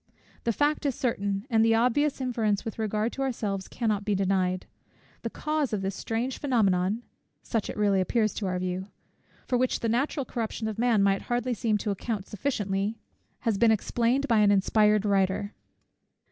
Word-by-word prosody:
The 235 - +3
fact 295 +7 +1
is 270 - -1
certain, 200 -4 -1
and 225 -4 +3
the 225 0 +4
obvious 250 +6 +2
inference 230 -6 0
with 225 - -5
regard 215 +1 0
to 275 - -5
ourselves 210 -7 -2
cannot 215 -4 -1
be 205 -1 0
denied. 185 -1 0 0.6
The - - -3
cause 305 -5 -1
of 200 -2 -1
this 195 +1 -1
strange 235 +5 -3
phænomenon, 210 -5 +1 0.4
(such 225 -3 -2
it - - -5
really 200 -2 +3
appears 215 +2 +1
to 200 - -3
our 180 0 -1
view) 185 +1 -3 0.6
for 250 - +1
which 255 0 +1
the 230 - 0
natural 270 +4 0
corruption 225 -2 -3
of 220 0 -4
man 235 -4 +3
might 195 0 +2
hardly 245 +1 0
seem 220 -1 +1
to 210 0 -2
account 200 0 -3
sufficiently, 205 -2 -2 0.4
has 225 -5 0
been 235 - +5
explained 235 +5 +1
by 230 -4 +4
an 210 -1 +5
inspired 210 +1 +3
writer. 195 0 +1
220 Hz, 175 wpm, -27 LUFS, 200-240 Hz, 0.6 s, been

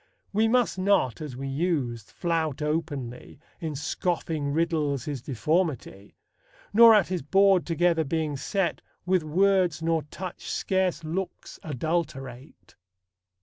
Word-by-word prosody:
We 220 +2 +3
must 235 -4 +2
not, 185 - +2
as 150 -5 -6
we 135 +1 -4
used, 135 - -2
flout 160 -4 -1
openly, 145 -6 -4 0.2
In 160 -3 -4
scoffing 155 -1 -2
riddles, 150 -4 0
his 145 -5 -4
deformity; 135 - -2 0.6
Nor 230 +1 +9
at 200 -5 +3
his 185 -3 -2
board 195 +4 +3
together 170 -1 +2
being 155 0 -2
set, 175 +4 -1 0.2
With 185 -1 +2
words 180 +1 +2
nor 165 -1 +1
touch 180 +4 -8
scarce 185 -4 0
looks 175 +3 -5
adulterate. 140 -3 -4
160 Hz, 120 wpm, -26 LUFS, 140-180 Hz, 0.6 s, Nor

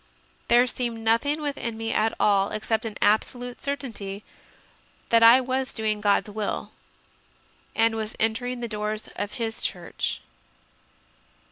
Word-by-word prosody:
There 240 +1 +6
seemed 235 -2 -3
nothing 285 +7 +2
within 260 -6 -3
me 225 0 -2
at 220 +1 +1
all 200 -1 +3
except 220 +1 -2
an 215 -2 -5
absolute 245 +4 +1
certainty 220 -8 -5 0.9
that 230 0 +5
I 230 +3 +9
was 260 +1 -2
doing 215 -2 -1
God 205 0 +3
s 210 - -10
will 215 -1 -3 1.0
and 225 0 +3
was 220 -1 -4
entering 245 +3 0
the 235 - -2
doors 215 0 -4
of 205 0 -4
His 225 -3 -3
Church. - - -3
225 Hz, 135 wpm, -25 LUFS, 215-245 Hz, 1.0 s, I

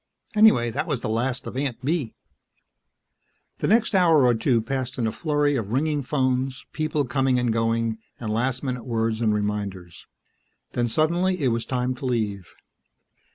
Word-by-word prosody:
Anyway, 210 - +5
that 155 - -2
was 140 -7 -1
the - - -3
last 125 +4 -1
of - - -7
Aunt 135 -2 -3
Bee! 145 -6 -1 1.4
The - - 0
next 225 +2 +3
hour 165 -7 +5
or 120 - +5
two 115 +1 +2
passed 130 +3 -3
in 120 - 0
a 110 - 0
flurry 145 -1 0
of 110 -5 -3
ringing 150 +2 +1
phones, 130 -1 -1
people 155 -2 -1
coming 135 0 +1
and 120 -2 +1
going, 115 0 0 0.2
and 110 -3 -3
last 125 +3 -1
minute 125 -3 -3
words 115 -1 -1
and 110 -2 +3
reminders. 100 -4 -3 0.7
Then 120 0 +1
suddenly 170 +6 +1
it 130 - +3
was 115 0 -1
time 125 0 -1
to 130 +1 -5
leave. 105 -6 -2
125 Hz, 165 wpm, -24 LUFS, 115-145 Hz, 1.4 s, Anyway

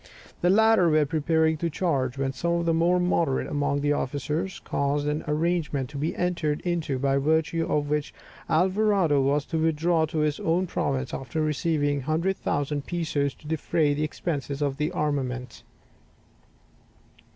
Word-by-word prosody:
The 175 - +3
latter 220 -3 +5
were 155 -1 +3
preparing 160 +1 +1
to 170 +2 -1
charge, 140 -6 -1
when 135 0 -1
some 170 +6 -1
of 170 0 0
the 165 - +2
more 170 +2 +3
moderate 170 -6 +1
among 145 -1 -1
the 145 0 +2
officers 150 +7 -2
caused 145 +1 -1
an 150 +1 -1
arrangement 150 -4 -1
to 145 - -7
be 155 +4 -1
entered 170 -4 -1
into, 170 -6 -1
by 135 +1 +1
virtue 160 +3 +1
of 145 -1 +1
which 150 0 -1 0.4
Alvarado 185 -3 +3
was 140 +2 +1
to 165 - -2
withdraw 160 +1 +2
to 160 - -5
his 150 -1 0
own 170 +3 +1
province 135 -6 -2
after 135 +4 -4
receiving 150 -1 0
100,000 150 -1 -1
pesos 155 -5 -1
to 150 - -15
defray 160 -1 +1
the 150 +2 -1
expenses 145 -2 -3
of 140 -2 -1
the 150 0 -1
armament. 130 -5 -2
150 Hz, 155 wpm, -26 LUFS, 145-170 Hz, 0.4 s, latter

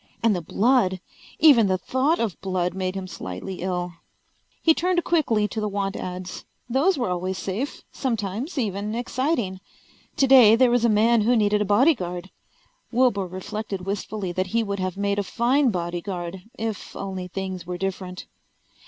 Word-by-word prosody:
And 225 -3 +4
the 175 - -2
blood! 195 +1 +2 0.4
Even 275 -9 +6
the 185 -1 +2
thought 260 - +1
of 220 -6 -2
blood 185 -2 -1
made 185 0 -2
him 190 -1 -4
slightly 135 - -6
ill. 180 -1 -2 0.7
He 325 - +6
turned 355 +1 +1
quickly 230 -11 +2
to 220 - -3
the 210 - -1
want 195 -1 -2
ads. 185 0 -6 0.2
Those 280 +10 +2
were 240 -7 -1
always 185 +1 -2
safe, 210 +11 -4
sometimes 230 - -3
even 210 -2 -2
exciting. 240 - -1 0.6
Today 255 -5 +7
there 245 +1 +4
was 240 -1 +2
a 235 - +4
man 225 +2 +4
who 240 +4 +3
needed 210 -1 +2
a - - +1
bodyguard. 190 - +2 0.6
Wilbur 235 -6 +2
reflected 195 +2 -5
wistfully 200 -1 -3
that 185 +2 -1
he 230 +4 +1
would 200 -2 -3
have 185 0 -2
made 200 0 0
a - - 0
fine 250 +7 +2
bodyguard, 175 0 -4 0.2
if 220 -2 -4
only 190 -2 -5
things 185 -1 -5
were 180 0 -3
different. 185 -1 -4
200 Hz, 160 wpm, -24 LUFS, 185-235 Hz, 0.7 s, Today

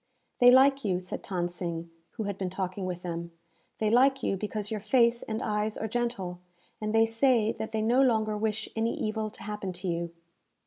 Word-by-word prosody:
"They 245 -1 +8
like 270 +2 +6
you," 185 -3 +1
said 180 0 -6
Than 180 -3 -1
Sing, 170 -1 -5 0.2
who 225 - -4
had 200 -1 -3
been 190 -1 -3
talking 185 0 -3
with 180 -1 -5
them. 170 -1 -5 0.4
"They 215 -1 +1
like 265 +3 +4
you, - - +1
because 210 +1 -4
your 215 - -1
face 235 +2 +3
and 220 0 -4
eyes 210 0 -1
are 220 - -2
gentle; 225 -6 -2 0.4
and 215 0 -1
they 225 +1 +5
say 225 -1 +3
that 220 - -4
they 220 -1 -1
no 240 +4 +4
longer 220 -5 +2
wish 220 0 -1
any 225 +1 -1
evil 215 0 -1
to - - -12
happen 210 -2 -4
to 180 +2 -5
you." 170 -1 -2
215 Hz, 205 wpm, -29 LUFS, 185-225 Hz, 0.4 s, They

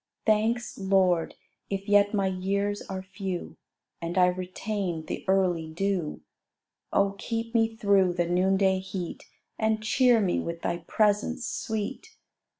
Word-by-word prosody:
Thanks, 220 +2 +1
Lord, 190 -3 +2 0.3
if 195 0 -3
yet 205 0 +5
my 200 -2 +1
years 200 +2 -1
are 190 -1 -6
few, 190 -2 -5 0.4
And 170 +2 -3
I 180 - +7
retain 185 -1 -3
the - - -5
early 180 -4 +2
dew: 180 -1 -2 0.7
Oh, 200 0 +2
keep 230 0 -3
me 225 -1 +2
through 200 -4 +3
the 175 0 0
noonday 190 +2 +2
heat, 185 -2 -6 0.3
And 220 0 +1
cheer 245 +1 +4
me 190 -4 +1
with 170 0 -5
Thy 170 - 0
presence 210 +7 +1
sweet. 220 - -3
195 Hz, 135 wpm, -27 LUFS, 180-215 Hz, 0.7 s, I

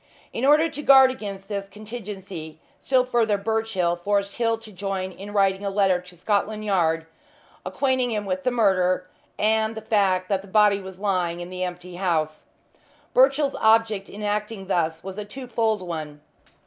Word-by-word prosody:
In 245 - -1
order 300 +3 +5
to 295 -2 -6
guard 265 -2 +7
against 200 -5 -7
this 200 -1 -4
contingency 195 -7 -8 0.2
still 260 -2 +2
further 230 -4 +2
Birchill 210 -4 0
forced 200 +2 -1
Hill 230 -1 +1
to 220 -1 -12
join 190 -1 -3
in 200 +3 -9
writing 195 -1 +2
a 200 - -1
letter 195 -2 +2
to 180 0 -15
Scotland 210 +3 -1
Yard, 165 -5 +1 0.6
acquainting 260 -2 0
them 210 -3 -2
with 275 +6 -2
the 255 - +2
murder, 185 -6 +2 0.3
and 220 +1 +1
the - - -4
fact 195 -4 +1
that 195 -1 0
the 200 - -14
body 205 0 +4
was 190 -1 -9
lying 180 -4 0
in 175 +1 -7
the 185 0 -3
empty 180 0 -6
house. 160 -5 -1 0.7
Birchill's 275 +2 +4
object 220 -2 +3
in 210 +1 -8
acting 210 -1 -2
thus 165 -3 -1
was 190 +2 -6
a - - -3
twofold 225 -3 -2
one. 155 -4 -6
200 Hz, 170 wpm, -24 LUFS, 185-225 Hz, 0.7 s, guard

